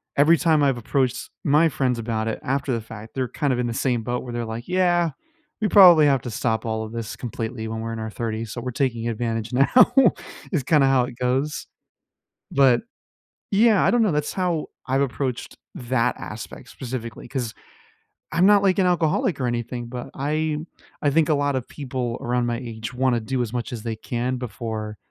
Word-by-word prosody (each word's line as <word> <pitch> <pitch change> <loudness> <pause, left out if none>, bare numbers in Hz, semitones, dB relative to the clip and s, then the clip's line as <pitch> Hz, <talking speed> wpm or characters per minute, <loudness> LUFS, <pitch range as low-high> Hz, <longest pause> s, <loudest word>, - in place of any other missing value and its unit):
every 160 +4 +5
time 155 -3 +3
I've 135 -3 +2
approached 125 +1 -1
my 150 +3 +4
friends 125 -5 0
about 110 -1 -2
it 110 - -2
after 135 +1 -1
the 115 - -1
fact, 110 0 -11
they're 130 -2 -1
kind 145 -4 0
of 125 - -2
in 120 - 0
the 115 - -2
same 120 -3 0
boat 125 +2 -2
where 120 - -7
they're 120 -1 -2
like, 115 +2 -6
"Yeah, 175 -2 +2 0.5
we 215 - +2
probably 175 -7 +8
have 135 -3 +3
to 120 - -5
stop 110 0 -1
all 110 0 -2
of 110 - -7
this 115 -2 -5
completely 115 -1 -5
when 110 0 -4
we're 115 0 -4
in 115 - -5
our 110 0 -4
30s, 110 0 -4
so, 120 - -5
we're 125 +1 -4
taking 120 -4 -1
advantage 115 +1 -3
now,” 140 - +5 0.6
is 150 -8 0
kinda 145 0 +4
how 130 -2 +4
it 125 -1 -9
goes 130 +4 -1 0.8
but, 135 -3 +4 0.7
yeah, 215 0 +4
I - - +4
don't 240 -1 +3
know, 210 - +3
that's 150 0 -1
how 175 -4 -1 0.2
I've 135 +1 +1
approached 130 -2 -3 0.2
that 125 -1 0
aspect 115 +3 -8
specifically, 120 -3 -6
'cause 120 -5 -3 0.8
I'm 170 +3 +3
not 205 0 +6
like 190 -1 +3
an 185 - +4
alcoholic 170 0 +1
or 125 - +1
anything, 120 0 -3
but 125 0 -7
I 155 +2 -1 0.4
I 145 - +3
think 160 +2 +3
a - - +4
lot 145 -1 0
of 130 -2 -3
people 125 -4 -4
around 120 0 0
my 120 -1 -1
age 115 -1 -6
wanna 125 -1 +1
do 130 +3 -2
as 115 -2 -2
much 120 0 -3
as 115 - -5
they 115 -2 -3
can 125 +3 -3
before 110 -2 -5
125 Hz, 205 wpm, -23 LUFS, 115-145 Hz, 0.8 s, probably